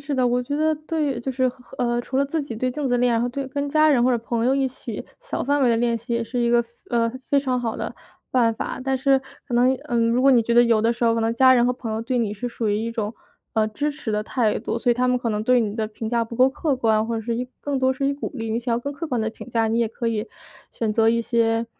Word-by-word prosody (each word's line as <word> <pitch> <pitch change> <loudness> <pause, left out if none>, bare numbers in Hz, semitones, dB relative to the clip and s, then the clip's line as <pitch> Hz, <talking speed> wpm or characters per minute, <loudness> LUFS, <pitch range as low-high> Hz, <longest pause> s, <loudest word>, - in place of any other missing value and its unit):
是 285 0 -3
的， 255 -1 +2
我 245 +1 +1
觉 285 +4 -3
得 310 0 +2
对 305 -5 -2
就 265 - -3
是 260 0 +1
和 250 0 -12
呃， 240 -1 +1
除 260 +2 -5
了 280 - +3
自 300 +2 -2
己 235 -6 -7
对 255 +2 -1
镜 295 +3 -5
子 - - +1
的 245 - +2
练， 240 -2 +2
和 245 - 0
对 270 +2 -4
跟 285 +2 -3
家 310 +1 +4
人 255 -5 +4
或 255 - +4
者 240 - +2
朋 230 0 -2
友 265 - +3
一 270 -1 +1
起 260 - -7 0.2
小 - - -4
范 285 +1 +2
围 250 - +4
的 230 - +3
练 235 0 +1
习 235 +2 -6
也 235 0 0
是 240 +2 -3
一 235 - +2
个， 235 0 +3 0.3
呃， 230 -1 +2 0.2
非 285 - +5
常 255 -3 0
好 230 -2 -2
的 - - -4 0.4
办 230 -3 +3
法。 - - -4
但 265 0 0
是 270 0 +3 0.3
可 245 - -4
能， 250 +2 +4
嗯， 230 -1 +1
如 250 +2 +2
果 275 - +6
你 240 -3 +5
觉 235 +1 0
得 240 - +7
有 230 -2 +3
的 230 +1 +3
时 240 0 -2
候 230 0 +4
可 230 - 0
能 225 0 +1
家 260 +1 +6
人 240 0 +4
和 250 - +2
朋 240 -3 -5
友 220 +1 -2
对 250 +1 -1
你 210 -3 -1
是 245 +4 -4
属 230 -2 -3
于 205 - +1
一 230 +2 -2
种， 220 -1 -3 0.4
呃， 215 -1 +2
支 290 +7 -2
持 280 -6 -5
的 210 0 0
态 225 -4 0
度， 230 - -3
所 240 - +1
以 - - +4
他 250 +1 +1
们 250 0 +2
可 235 - -2
能 210 -1 -1
对 250 +1 +4
你 215 0 -2
的 220 -1 -1
评 220 +1 -6
价 235 -1 +1
不 230 - -9
够 255 +3 +5
客 280 +1 -1
观， 220 -3 +1
或 230 - -2
者 225 - -2
是 230 +1 -2
一 250 +1 -3
更 285 -2 -2
多 260 0 +2
是 275 +1 -2
以 280 - 0
鼓 285 - -5
励。 225 -3 -4
你 225 - 0
想 240 0 -2
要 - - 0
更 285 +3 -4
客 330 +4 -5
观 245 -5 -1
的 220 0 -1
评 245 - -11
价， 225 -1 +1
你 230 +1 +1
也 230 - +2
可 230 +1 -3
以 220 0 -2 0.5
选 220 -2 -1
择 225 0 +3
一 235 0 +1
些， 230 0 +1
240 Hz, 340 characters per minute, -23 LUFS, 230-260 Hz, 0.5 s, 得